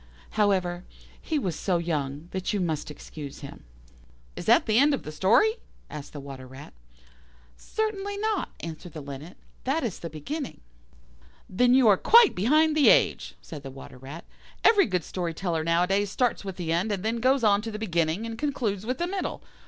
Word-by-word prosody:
However, 185 -4 +1 0.4
he 315 - -1
was 185 - -2
so 185 -3 0
young 150 -2 -3
that 190 +1 -2
you 205 - 0
must 160 -5 -2
excuse 150 -1 -9
him." 140 - -10 0.7
"Is - - -7
that - - +5
the 220 +1 +3
end 285 +1 +5
of - - -9
the 155 - -6
story?" 235 - +3 0.3
asked 150 -1 -8
the 145 - -6
Water 135 -2 -9
rat. 130 +3 -12 0.8
"Certainly 405 - -3
not," 430 -1 -1
answered 165 0 -8
the 155 - -7
Linnet, 140 +5 -9 0.3
"that 275 +5 0
is 225 -7 -3
the 170 - -6
beginning." 260 - -6 0.9
"Then 245 +6 +3
you 260 -3 +5
are 200 -3 +6
quite 465 - +6
behind 305 - +3
the 300 -3 +6
age," - - +3
said 150 -3 -8
the 135 - -8
Water 130 -1 -11
rat. 140 +6 -9 0.4
"Every 410 - +6
good 180 -5 -1
story 170 -1 -4
teller 165 -3 -1
nowadays 180 +5 +2
starts 245 +3 0
with 195 -2 -5
the 170 -3 -3
end, 185 +6 0
and 200 -2 -2
then 225 +1 0
goes 260 +2 +2
on 205 -1 +4
to 225 - -5
the 210 - -5
beginning, 170 -1 0
and 225 0 -6
concludes 230 -8 -2
with 255 - -1
the 345 - -1
middle. 380 +1 -4
195 Hz, 190 wpm, -26 LUFS, 160-260 Hz, 0.9 s, are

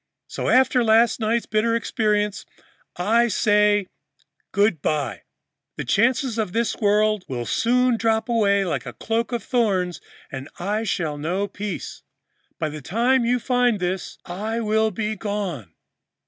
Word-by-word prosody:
So, - - -3
after 255 -1 +4
last 230 +1 +4
night's 225 +1 0
bitter 225 +2 +1
experience, 210 -3 0 0.5
I 230 +6 +3
say 210 -2 +3 0.7
good 200 -6 +2
by. 145 -9 -1 0.6
The - - -4
cares 235 +2 +1
of 205 -5 -2
this 230 0 0
world 210 -1 +2
will 120 -2 -4
soon 250 - +2
drop 225 0 +1
away 200 -4 +2
like 175 - -3
a - - -6
cloak 230 +2 -2
of 240 -1 -2
thorns 195 -8 0 0.3
and 135 +1 -7
I 210 +5 -2
shall 155 -8 -2
know 180 +7 -1
peace. 205 -2 -6 0.6
By 155 - -2
the 150 0 -7
time 235 - +1
you 245 +1 +2
find 245 -3 +1
this, 180 +1 -3
I 215 +6 -3
will 220 0 +1
be 215 +1 -3
gone.'" 195 - -4
215 Hz, 145 wpm, -23 LUFS, 190-230 Hz, 0.7 s, after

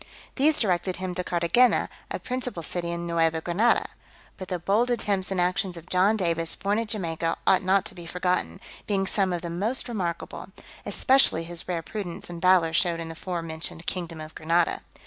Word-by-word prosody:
These 300 +3 +4
directed 185 -3 +1
him 185 -1 -4
to 180 0 -2
Carthagena, 175 +9 +3 0.2
a - - -2
principal 250 -8 -4
city 170 +1 -3
in 170 0 -3
Neuva 165 -1 +1
Granada. 180 +9 +2 0.5
But 185 - -8
the 180 - -2
bold 205 +8 +1
attempts 205 -5 0
and 190 -2 -1
actions 180 0 0
of 170 +2 -12
John 195 +4 +4
Davis, 165 -3 0
born 205 +2 0
at 230 - -2
Jamaica, 165 -6 -1
ought 185 - +5
not 190 +1 +2
to - - -7
be 175 -2 -10
forgotten, 180 - -1 0.3
being 195 -2 +1
some 190 -1 +2
of 175 -1 -3
the 170 - -4
most 210 +11 0
remarkable; 180 -8 -4 0.4
especially 260 -11 +3
his 170 0 -2
rare 170 -2 -2
prudence 180 -3 -6
and 170 -1 -7
valour 180 -3 +4
showed 170 -1 +2
in 165 -1 -5
the - - -6
fore 175 +1 -4
mentioned 160 +1 -5
kingdom 170 -3 -3
of 155 0 -8
Granada. 165 +1 +1
180 Hz, 190 wpm, -26 LUFS, 170-195 Hz, 0.5 s, ought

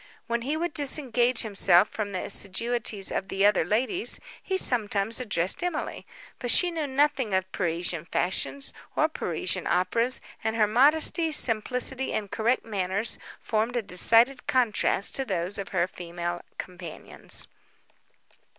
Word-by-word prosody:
When 235 0 -2
he 280 +6 -2
could 340 -1 -3
disengage 255 -4 +2
himself 195 -3 +4
from 210 -2 -5
the 185 - -4
assiduities 210 0 +1
of 195 - -3
the 195 0 0
other 205 -4 +4
ladies, 255 - 0 0.2
he 380 - -2
sometimes 220 - 0
addressed 195 - +1
Emily: 355 -3 -4 0.3
but 245 - -3
she 350 +8 +5
knew 320 -3 -3
nothing 265 -6 +1
of 190 0 -2
Parisian 170 -2 -2
fashions, 230 +11 -2 0.2
or 310 - +3
Parisian 185 - -3
operas; 230 +8 +1 0.2
and 220 0 -1
her 220 -2 +3
modesty, 300 - +3
simplicity, 250 +1 -1
and 205 -2 -3
correct 235 +3 0
manners 200 0 -1 0.2
formed 225 +2 -1
a 240 - -1
decided 230 +7 +3
contrast 220 -5 +1
to 270 - 0
those 190 -3 -2
of 200 - -5
her 175 -2 +1
female 175 -1 -6 0.2
companions. 175 -3 -3
220 Hz, 140 wpm, -26 LUFS, 190-260 Hz, 0.3 s, she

